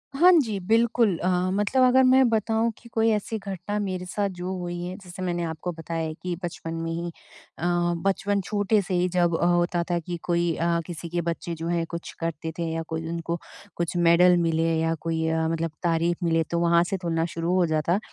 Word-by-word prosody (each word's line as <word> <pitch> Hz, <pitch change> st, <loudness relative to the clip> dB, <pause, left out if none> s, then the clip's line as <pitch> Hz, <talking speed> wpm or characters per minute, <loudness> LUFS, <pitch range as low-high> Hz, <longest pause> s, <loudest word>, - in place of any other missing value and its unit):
हाँ 355 Hz, +5 st, +7 dB
जी, 215 Hz, -6 st, -3 dB
बिल्कुल। 225 Hz, 0 st, +2 dB
अ, 180 Hz, -, -2 dB, 0.3 s
मतलब 205 Hz, +6 st, +2 dB
अगर 255 Hz, +1 st, +6 dB
मैं 260 Hz, 0 st, +6 dB
बताऊँ 225 Hz, +1 st, +1 dB
कि 235 Hz, -, -16 dB
कोई 225 Hz, 0 st, +2 dB
ऐसी 215 Hz, +1 st, -1 dB
घटना 195 Hz, 0 st, -4 dB
मेरे 185 Hz, -3 st, -3 dB
साथ 200 Hz, +2 st, -1 dB
जो 185 Hz, +1 st, -3 dB
हुई 175 Hz, -1 st, -4 dB
हैं। 180 Hz, +1 st, -5 dB
जैसे 180 Hz, +1 st, -9 dB
मैंने 175 Hz, -1 st, -1 dB
आपको 165 Hz, +2 st, -4 dB
बताया 165 Hz, 0 st, -4 dB
है 155 Hz, -, -4 dB
कि 175 Hz, +2 st, -4 dB
बचपन 165 Hz, -1 st, -5 dB
में 165 Hz, 0 st, -3 dB
ही 170 Hz, +1 st, -3 dB, 0.5 s
अ, -, -, -8 dB, 0.4 s
बचपन 200 Hz, +1 st, +1 dB
छोटे 205 Hz, +1 st, +1 dB
से 185 Hz, 0 st, -5 dB
ही 180 Hz, 0 st, +2 dB
जब 175 Hz, -2 st, +2 dB
अ, -, -, +1 dB
होता 175 Hz, 0 st, +2 dB
था 175 Hz, -, +2 dB
कि 175 Hz, +1 st, -5 dB
कोई 170 Hz, -1 st, +1 dB
अ, 170 Hz, 0 st, +1 dB
किसी 170 Hz, -1 st, -6 dB
के 175 Hz, 0 st, -1 dB
बच्चे 170 Hz, 0 st, -3 dB
जो 165 Hz, +1 st, -5 dB
हैं 170 Hz, -1 st, 0 dB
कुछ 170 Hz, 0 st, -6 dB
करते 165 Hz, -1 st, -3 dB
थे 165 Hz, -, -1 dB
या 165 Hz, 0 st, -2 dB
कोई 160 Hz, 0 st, -4 dB
उनको 170 Hz, 0 st, -3 dB, 0.4 s
कुछ 170 Hz, 0 st, -2 dB
मेडल 175 Hz, +1 st, +5 dB
मिले 165 Hz, -1 st, +1 dB
या 165 Hz, 0 st, +1 dB
कोई 160 Hz, -1 st, -1 dB
अ, 160 Hz, 0 st, +1 dB
मतलब 165 Hz, 0 st, -1 dB
तारीफ़ 170 Hz, +1 st, +1 dB
मिले 165 Hz, -1 st, +2 dB
तो 170 Hz, -, +1 dB
वहाँ 170 Hz, 0 st, +4 dB
से 190 Hz, +2 st, -2 dB
तुलना 165 Hz, -2 st, 0 dB
शुरू 165 Hz, +2 st, -1 dB
हो 180 Hz, -2 st, +4 dB
जाता। 160 Hz, +4 st, +1 dB
175 Hz, 215 wpm, -25 LUFS, 165-195 Hz, 0.5 s, हाँ